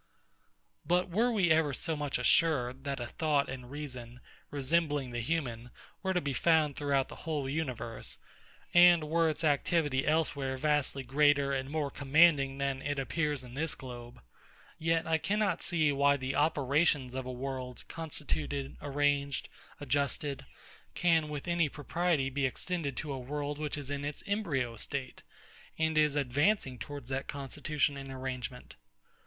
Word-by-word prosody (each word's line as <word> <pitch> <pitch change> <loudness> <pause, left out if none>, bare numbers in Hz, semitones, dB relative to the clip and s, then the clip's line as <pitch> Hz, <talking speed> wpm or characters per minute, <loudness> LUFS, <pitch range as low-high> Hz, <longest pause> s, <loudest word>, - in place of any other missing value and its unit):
But 180 +3 +1
were 230 +7 +2
we 190 -7 +2
ever 155 -4 +3
so 160 +4 -1
much 145 -2 -1
assured, 130 -1 +2
that 140 -1 -2
a 120 - -3
thought 145 +3 +1
and 125 -1 -7
reason, 125 -4 -7 0.3
resembling 145 -2 +1
the 120 - -3
human, 125 -4 -2 0.3
were 190 -1 -1
to - - +4
be 140 -4 -2
found 155 -1 +3
throughout 140 -2 +1
the - - -10
whole 150 -4 -3
universe, 130 -6 -4 0.6
and 175 -2 +7
were 165 +1 +2
its 155 +1 -2
activity 145 -2 +2
elsewhere 140 -4 +1
vastly 145 -1 +1
greater 140 +1 +3
and 135 0 -2
more 145 -2 -1
commanding 140 -1 +4
than 140 -1 -1
it 145 0 -2
appears 145 0 -1
in 125 -1 -11
this 155 +3 -1
globe; 120 -2 -10 0.6
yet 165 +1 +1
I 160 0 +1
cannot 205 +5 0
see, 160 -4 +3
why 140 0 +3
the 130 0 -3
operations 145 -2 +2
of 130 -1 -4
a - - -3
world 125 -1 -5
constituted, 150 -3 -4
arranged, 145 -1 0 0.3
adjusted, 140 0 -1 0.5
can 165 -3 +3
with 150 +2 -5
any 170 -3 +2
propriety 150 -1 0
be 135 0 +1
extended 150 -2 -3
to 150 -2 -3
a 135 - -4
world 145 +3 -4
which 150 -1 -2
is 145 -1 -6
in 145 0 -3
its 145 0 -5
embryo 145 - -1
state, 130 +2 -4 0.6
and 160 0 +1
is 150 -2 +4
advancing 145 - +1
towards 145 -4 -7
that 135 0 -3
constitution 140 +1 -1
and 135 -1 -7
arrangement. 130 -1 -6
145 Hz, 155 wpm, -31 LUFS, 135-160 Hz, 0.6 s, and